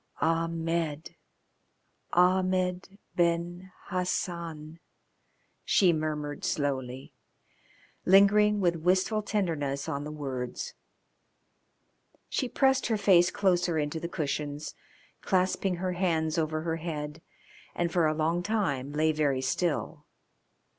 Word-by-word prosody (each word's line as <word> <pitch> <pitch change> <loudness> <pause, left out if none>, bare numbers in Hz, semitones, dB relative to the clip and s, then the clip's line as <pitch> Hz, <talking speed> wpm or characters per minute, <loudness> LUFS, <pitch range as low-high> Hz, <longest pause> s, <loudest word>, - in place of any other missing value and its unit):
"Ahmed! 165 -1 -1 1.0
Ahmed 185 +1 +2 0.2
Ben 175 +2 0 0.2
Hassan," 170 -4 -3 0.8
she 180 -4 +4
murmured 150 -2 -3
slowly, 130 -3 -2 0.9
lingering 205 +2 +5
with 175 -3 +2
wistful 185 +6 +2
tenderness 160 -10 -2
on 145 -3 -3
the 150 - -6
words. 140 - -5 1.6
She 255 - -1
pressed 265 0 +2
her 225 -2 +1
face 185 -3 +5
closer 180 -4 +1
into 150 +1 -1
the 170 - -5
cushions, 150 -2 -3 0.5
clasping 185 0 +1
her 185 +1 -2
hands 165 -3 0
over 155 0 -1
her 165 0 -2
head, 155 -2 -5 0.5
and 170 -1 0
for 170 -3 +3
a 155 - 0
long 165 +3 +1
time 180 -10 -1
lay 155 +1 +2
very 145 -4 +1
still. 150 +2 -2
170 Hz, 105 wpm, -29 LUFS, 150-185 Hz, 1.6 s, lingering